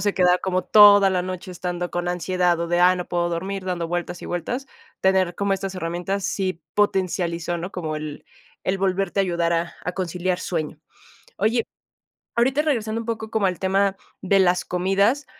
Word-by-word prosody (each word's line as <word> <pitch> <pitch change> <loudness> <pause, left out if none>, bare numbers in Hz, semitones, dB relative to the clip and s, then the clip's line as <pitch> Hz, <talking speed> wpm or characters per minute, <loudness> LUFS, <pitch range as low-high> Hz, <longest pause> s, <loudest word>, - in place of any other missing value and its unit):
se 205 +1 0
queda 180 -1 +4
como 185 -1 -1
toda 205 -2 +8
la 180 -1 0
noche 185 0 -6
estando 175 0 -4
con 175 0 -2
ansiedad, 180 0 +1
o 170 - -1
de: 175 +1 +1
Ay, 180 +1 +5
no 180 - -3
puedo 175 -1 0
dormir 190 +3 -3
dando 175 -2 -2
vueltas 175 0 -3
y - - -6
vueltas, 240 - -3 0.3
tener 190 -2 +2
como 200 0 0
estas 195 0 -3
herramientas, 180 +3 -3
sí 185 -3 -2
potencializó, 175 -4 0
¿no?, 175 +3 -5
como 160 -5 -4
el 150 -1 -7 0.4
el 185 - +1
volverte 195 0 0
a - - +4
ayudar 170 -2 0
a 170 0 -1
a 180 - -2
conciliar 180 0 -2
sueño. 155 -5 -3 0.6
Oye, 225 +4 +1 0.7
ahorita 265 +5 +3
regresando 230 -7 -1
un - - -12
poco 220 -1 -4
como 220 -3 +1
al 180 -2 -1
tema 195 +1 +1 0.3
de 195 +1 +3
las 180 -1 +3
comidas, 200 +10 +1
185 Hz, 185 wpm, -23 LUFS, 175-195 Hz, 0.7 s, toda